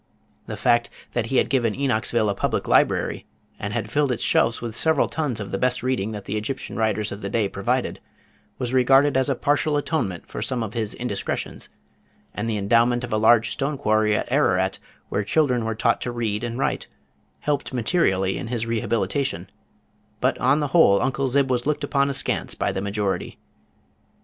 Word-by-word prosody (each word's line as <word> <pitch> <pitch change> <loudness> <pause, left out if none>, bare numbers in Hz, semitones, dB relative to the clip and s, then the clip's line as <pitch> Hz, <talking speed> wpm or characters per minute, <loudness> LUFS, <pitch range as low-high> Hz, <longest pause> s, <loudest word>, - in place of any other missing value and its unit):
The - - -5
fact 120 0 +2 0.2
that - - -1
he - - 0
had - - +3
given 120 -4 +1
Enochsville 120 -4 +1
a 100 - +1
public - - -1
library, - - +2 0.3
and 100 - -4
had 110 -1 -3
filled 145 0 +2
its 120 - -2
shelves 115 0 +2
with 115 -2 -5
several 160 +4 +2
tons 145 -8 -2
of 100 -2 -6
the 95 - -2
best 125 -1 0
reading 125 -5 -1
that 105 -2 -7
the 105 - -2
Egyptian 120 +3 -4
writers 105 -1 0
of 100 - -7
the 100 - -4
day 105 -1 +1
provided, 120 +7 -2 0.6
was 125 -1 -3
regarded 135 +3 +4
as 130 +2 +2
a 135 - +1
partial 145 +3 +1
atonement 140 - -2
for - - -7
some 125 -3 -1
of 110 -1 -6
his 110 -3 -2
indiscretions, 120 -5 -4 0.6
and 115 - -3
the 110 - -1
endowment 115 +4 +2
of 120 - -4
a - - +2
large 115 +1 +4
stone 140 +1 -2
quarry 110 -4 +2
at 110 - -3
Ararat 95 -9 +2 0.3
where 100 - -1
children 125 -1 +1
were 110 0 -2
taught - - +1
to 120 - -3
read 115 -2 -2
and 120 0 -3
write, 135 - -1 0.5
helped 145 -1 -1
materially 105 - +1
in - - -5
his 115 -1 -2
rehabilitation, 115 -2 -1 0.7
but - - +2
on 150 - +3
the 145 - -1
whole 135 - +5
Uncle 135 +5 0
Zib 135 +1 +2
was 125 +1 0
looked 150 -1 0
upon 140 -1 +1
askance 140 -1 -1
by - - -1
the 95 - -3
majority. 100 -1 -2
120 Hz, 190 wpm, -23 LUFS, 105-135 Hz, 0.7 s, whole